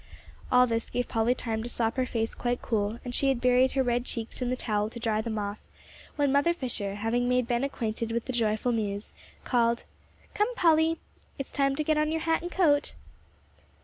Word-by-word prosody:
All 250 0 +7
this 230 -1 -2
gave 245 0 -1
Polly 225 +2 +1
time 225 -3 -3
to 235 - -5
sop 225 -2 0
her 255 -1 0
face 225 -2 -2
quite 245 0 -1
cool, 215 -1 0
and 245 - -4
she 275 - +1
had 265 -3 +1
buried 250 +1 +4
her 270 - +2
red 240 -1 +1
cheeks 230 0 -5
in 250 - 0
the 255 - +1
towel 210 -4 -1
to 235 - -8
dry 220 -2 0
them 220 0 -3
off, 205 0 -3 0.5
when 285 -2 +2
Mother 285 +5 +3
Fisher, 220 -10 -3
having 235 +4 0
made 250 -1 +2
Ben 240 +1 0
acquainted 230 -4 -2
with 235 0 -1
the 255 - -4
joyful 225 +1 +1
news, 205 -2 -2 0.3
called, 235 -1 +1 0.5
"Come, 430 +4 0
Polly, 325 -3 +4 0.4
it's 275 - -5
time 275 -1 +1
to 305 - 0
get 305 0 +2
on 305 0 +1
your 320 0 -1
hat 325 0 +1
and 350 +1 -5
coat." 300 -6 +2
245 Hz, 210 wpm, -28 LUFS, 225-275 Hz, 0.5 s, All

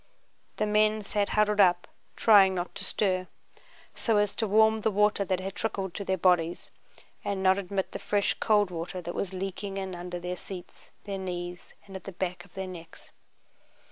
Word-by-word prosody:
The 215 - +1
men 215 0 +2
sat 205 0 0
huddled 210 -1 +2
up 175 -2 +4 0.3
trying 195 -4 +6
not 175 0 -3
to - - -5
stir, 185 -3 0 0.7
so 225 -3 +1
as 205 -1 +2
to 220 - 0
warm 220 +2 +4
the 220 - +2
water 210 0 +2
that 185 -1 -1
had 190 +1 -5
trickled 195 -5 -3
to 200 - -4
their 190 -1 0
bodies 175 -2 +1 0.5
and 195 -1 -2
not 190 +1 +4
admit 195 0 -3
the - - -5
fresh 205 -1 +1
cold 205 -4 +3
water 175 +2 -4
that 175 -1 -5
was 195 - -3
leaking 195 +1 -4
in 190 -1 -4
under 175 0 -5
their 180 +1 -4
seats, 180 -2 -10
their 200 -1 -4
knees, 175 -1 -6
and 195 - -11
at 190 - -8
the 195 - -7
back 180 0 -3
of 195 - -23
their 190 0 -3
necks. 175 -3 -11
190 Hz, 190 wpm, -28 LUFS, 180-205 Hz, 0.7 s, trying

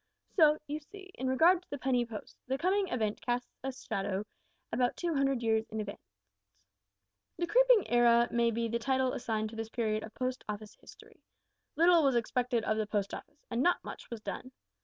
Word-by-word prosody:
So, 310 -4 +6
you 300 +1 -4
see, 380 +5 -13
in 260 - -4
regard 335 +8 +5
to - - -29
the 285 - -4
Penny 250 -2 +1
Post, 220 -3 -8
the 265 +1 0
coming 380 +5 +1
event 220 -8 -1
cast 245 0 -1 0.2
its 265 -1 -6
shadow 195 0 -2 0.5
about 245 +1 +1
two 345 -2 -1
hundred 275 -3 +1
years 220 -1 +1
in 220 - -4
advance. 205 -1 -8 1.2
"The 345 - 0
Creeping - - +5
Era 235 0 +5
may 235 0 +3
be 230 0 -1
the 230 +1 -1
title 260 +1 +1
assigned 220 -3 -2
to - - -9
this 225 0 -4
period 215 -2 -1
of 220 0 -10
Post 255 0 -2
Office 210 0 -5
history. - - -16 0.5
Little 340 +1 +6
was 270 -3 +3
expected 240 0 0
of 215 - 0
the 215 -1 -1
Post 205 -2 -1
Office, 295 - -10
and 235 +1 0
not 355 +5 +2
much - - -9
was 235 -2 -6
done. 255 - -6
245 Hz, 195 wpm, -31 LUFS, 225-290 Hz, 1.2 s, So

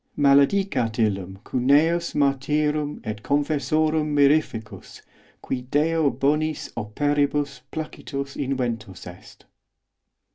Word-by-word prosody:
Maledicat 140 - +3
illum 95 -4 -1
cuneus 150 +7 +2
martyrum 150 +2 0
et 105 -1 -5
confessorum 150 +3 +1
mirificus, 140 -8 0 0.4
qui 130 - -3
Deo 155 +1 +2
bonis 150 +4 -1
operibus 140 +4 -1
placitus 140 -3 -6
inventus 120 -8 -3
est. 90 0 -13
140 Hz, 80 wpm, -24 LUFS, 125-150 Hz, 0.4 s, Maledicat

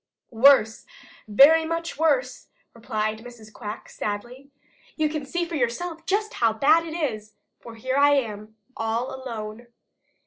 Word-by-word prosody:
"Worse, 230 -2 +4 0.4
very 285 +10 +6
much 330 -1 -4
worse," 260 -6 0 0.3
replied 215 -1 -3
Mrs. 225 -2 -13
Quack 210 +2 -8
sadly. 240 +7 -6 0.5
"You 310 -1 +1
can 300 -2 -5
see 345 +4 -2
for 340 - -10
yourself 320 +6 -3
just 415 +2 0
how 225 -2 +3
bad 310 +8 +3
it 320 - -6
is, 215 -10 -4 0.2
for 230 -1 -12
here 260 +4 -2
I 285 0 +5
am 215 -4 -4 0.2
all 225 +3 -2
alone." 235 -3 -7
250 Hz, 140 wpm, -24 LUFS, 220-310 Hz, 0.5 s, very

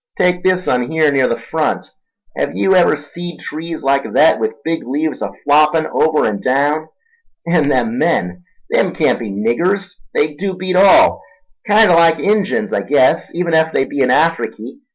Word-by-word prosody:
Take 180 0 +1
this 185 -1 0
un 125 -1 0
here 155 -2 +2
near 135 -2 +2
the 115 - -2
front. 155 +7 -3 0.4
Hev - - -3
yew 190 - +2
ever 175 -4 +3
seed 170 +4 -9
trees 160 +1 -7
like 140 +1 0
thet, 155 -6 +4
with 110 +6 -4
big 165 0 -2
leaves 150 +3 -3
a 100 - -4
floppin' 150 +2 +3
over 155 -1 +1
an' 105 -2 -2
daown? 145 +4 0 0.6
And 165 -4 +1
them 120 -3 0
men—them 90 - -2
can't - - +1
be 115 - -6
niggers—they 155 - -2
dew 190 +1 -3
beat 185 0 -3
all. 190 +1 +5 0.5
Kinder 210 -2 +5
like 165 -1 +4
Injuns, 210 +4 -1
I - - 0
guess, 135 -2 +1
even 170 -1 -2
ef 160 0 +2
they 135 - +1
be 145 - -6
in 130 -2 +2
Afriky. 165 - -1
155 Hz, 170 wpm, -16 LUFS, 135-180 Hz, 0.6 s, all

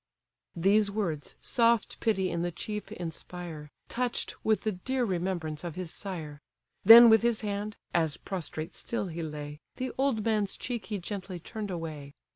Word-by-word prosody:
These 200 +4 +4
words 185 -8 -3
soft 235 -3 +2
pity 195 -5 +1
in 170 0 -1
the 175 - 0
chief 210 +4 -5
inspire, 170 -4 -6 0.2
Touch'd 245 0 -2
with 220 -1 +2
the 215 - 0
dear 250 +7 -1
remembrance 175 -5 -2
of 170 -3 -5
his 180 -3 -4
sire. 160 -7 -6 0.4
Then 230 +3 +12
with 220 -1 +7
his 235 -1 +2
hand 205 0 -3 0.2
(as 160 -3 +1
prostrate 165 -4 -5
still 215 -5 -3
he 170 0 -5
lay) 150 -1 -6 0.2
The 255 0 -3
old 265 -6 +1
man's 215 -3 +1
cheek 235 -6 -4
he 210 - -2
gently 190 0 -5
turn'd 210 +4 -6
away. 155 -5 -6
190 Hz, 160 wpm, -29 LUFS, 165-220 Hz, 0.4 s, Then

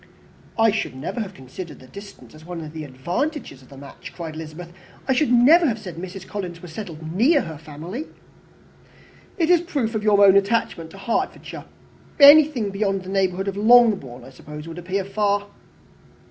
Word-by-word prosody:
"I 225 -1 +4
should 215 -10 -3
never 140 - -5
have 200 -4 -5
considered 150 +6 -9
the - - -15
distance 200 +9 -13
as 155 0 -15
one 175 0 -7
of 155 -1 -9
the 155 -1 -6
advantages 170 - -4
of 130 - -19
the 135 - -13
match," 140 0 -11
cried 165 -3 -6
Elizabeth. 160 +2 -9 0.3
"I 265 - +3
should 270 0 +1
never 300 +8 +6
have 230 -4 -1
said 185 -7 -9
Mrs. 185 +2 -8
Collins 180 -5 -6
was 170 -2 -11
settled 160 -6 -7
near 275 - +4
her 160 -8 -8
family." 165 - -7 1.3
"It 340 -1 +2
is 350 -2 +5
a - - -10
proof 275 -10 -2
of 215 -1 -2
your 205 -1 +5
own 195 -1 +6
attachment 200 -5 0
to 195 - -13
Hertfordshire. 210 +4 -3 0.5
Anything 285 -7 +7
beyond 195 -1 -1
the 185 +1 -8
very 195 -1 +2
neighbourhood 185 +2 -5
of 195 - -2
Longbourn, 210 - +4
I 135 - -13
suppose, 150 +4 -10
would 165 +1 -8
appear 185 +2 -3
far." 205 0 0
195 Hz, 190 wpm, -22 LUFS, 160-225 Hz, 1.3 s, Anything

